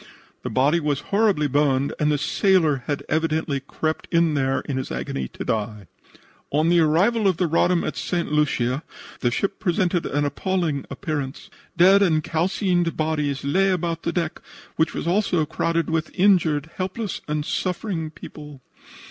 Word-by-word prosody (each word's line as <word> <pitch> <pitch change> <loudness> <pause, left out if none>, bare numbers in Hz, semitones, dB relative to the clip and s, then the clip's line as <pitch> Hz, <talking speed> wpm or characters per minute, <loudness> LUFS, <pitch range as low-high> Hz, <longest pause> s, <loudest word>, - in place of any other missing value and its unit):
The - - -4
body 145 +6 +2
was 150 -3 -1
horribly 200 -7 +3
burned 140 -1 +1
and 150 0 +2
the 150 - +2
sailor 165 -2 +2
had 145 -1 -2
evidently 155 -2 0
crept 155 +3 -3
in 170 -2 +3
there 135 -2 0
in 135 - -4
his 130 - -4
agony 65 -1 -3
to - - -8
die. 105 -2 -2 0.6
"On 155 +3 +2
the 175 0 +4
arrival 190 +8 +3
of 185 -4 +2
the 180 - +1
Roddam 170 +2 +2
at - - -3
St. 175 -4 -2
Lucia 135 -3 +1 0.4
the 120 - +1
ship 195 +11 -2
presented 175 -1 0
an 145 +1 0
appalling 160 -1 -1
appearance. 150 -6 -5 0.3
Dead 190 +3 +6
and 160 -5 +3
calcined 175 +1 0
bodies 150 -3 -1
lay 190 +8 +2
about 170 -3 -1
the 170 - -1
deck, 170 -2 -2 0.3
which 160 0 0
was - - -3
also 175 -3 +1
crowded 165 +2 -1
with 160 -1 -1
injured 165 -6 +3
helpless 190 +2 -3
and 150 0 -2
suffering 180 -3 -2
people. 150 -2 -11
160 Hz, 160 wpm, -23 LUFS, 145-180 Hz, 0.6 s, Dead